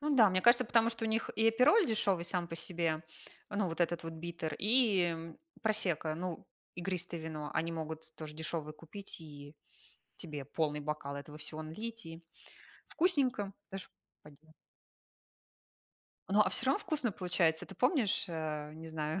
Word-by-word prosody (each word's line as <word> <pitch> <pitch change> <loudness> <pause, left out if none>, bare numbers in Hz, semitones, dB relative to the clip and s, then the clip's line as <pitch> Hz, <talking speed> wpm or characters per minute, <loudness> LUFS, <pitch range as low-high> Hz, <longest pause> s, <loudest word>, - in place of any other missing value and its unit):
Ну 295 0 +1
да, 220 -5 +8
мне 185 0 +2
кажется, 240 +1 +7
потому 230 0 +4
что 230 0 -3
у - - +1
них 225 +1 0
и 225 +1 +5
апероль 280 - +5
дешёвый 200 -6 +1
сам 175 -1 -1
по 165 - -5
себе, 165 -2 -1 0.5
ну, 205 -1 +1
вот 165 - -5
этот 175 0 +1
вот 165 0 -5
биттер, 165 -1 -4
и, 215 -2 +4
м, 165 -1 -4 0.2
просекко, 180 -8 +2
ну 170 0 -5 0.3
игристое 175 -2 -2
вино, 155 -2 -5
они 165 +1 0
могут 160 0 -6
тоже 155 -1 -7
дешёвое 160 -1 -3
купить, 175 +7 -9
и 145 -1 -11 0.6
тебе 150 -4 -6
полный 150 0 -1
бокал 145 -1 -3
этого 145 +1 -8
всего 155 +1 -5
налить, 220 +5 -6
и 165 +1 -9 0.7
вкусненько, 260 - +2 0.2
даже 195 -1 -6 0.4
пойдё 150 +2 -17 1.8
Ну, 205 +2 +4
а - - +6
всё - - +4
равно 270 - +4
вкусно 310 - -1
получается. 170 -3 +1
Ты - - -10
помнишь, 250 - +2
э, 155 -2 -3
не 160 +1 -9
знаю, 155 +2 -2
170 Hz, 160 wpm, -34 LUFS, 155-215 Hz, 1.8 s, да